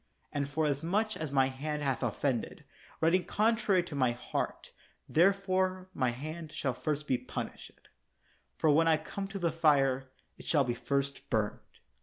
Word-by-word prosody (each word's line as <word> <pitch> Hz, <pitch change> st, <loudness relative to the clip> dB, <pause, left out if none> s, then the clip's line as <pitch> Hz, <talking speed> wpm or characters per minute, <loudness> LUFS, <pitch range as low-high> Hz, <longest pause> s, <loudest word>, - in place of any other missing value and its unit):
And 140 Hz, -1 st, -2 dB
forasmuch 160 Hz, +9 st, 0 dB
as 155 Hz, -3 st, -4 dB
my 135 Hz, -1 st, +4 dB
hand 150 Hz, +3 st, -3 dB
hath 135 Hz, -2 st, 0 dB
offended, 120 Hz, +1 st, -1 dB, 0.4 s
writing 170 Hz, +3 st, +4 dB
contrary 215 Hz, -4 st, +2 dB
to 175 Hz, -, -9 dB
my 130 Hz, -4 st, +2 dB
heart, 120 Hz, +1 st, -4 dB, 0.4 s
therefore 185 Hz, +1 st, +2 dB
my 130 Hz, -, +1 dB
hand 155 Hz, +6 st, -6 dB
shall 135 Hz, -4 st, -1 dB
first 150 Hz, +3 st, -2 dB
be 130 Hz, -4 st, +1 dB
punished; -, -, -7 dB, 0.7 s
for 155 Hz, -, +3 dB
when 165 Hz, +3 st, +4 dB
I 160 Hz, -1 st, +5 dB
come 195 Hz, +5 st, -5 dB
to 195 Hz, 0 st, -6 dB
the 170 Hz, -3 st, +1 dB
fire, 135 Hz, -5 st, +3 dB, 0.3 s
it -, -, -11 dB
shall 145 Hz, -4 st, +4 dB
be 120 Hz, -2 st, -1 dB
first 140 Hz, +2 st, -2 dB
burned. 110 Hz, -4 st, 0 dB
150 Hz, 155 wpm, -31 LUFS, 135-175 Hz, 0.7 s, I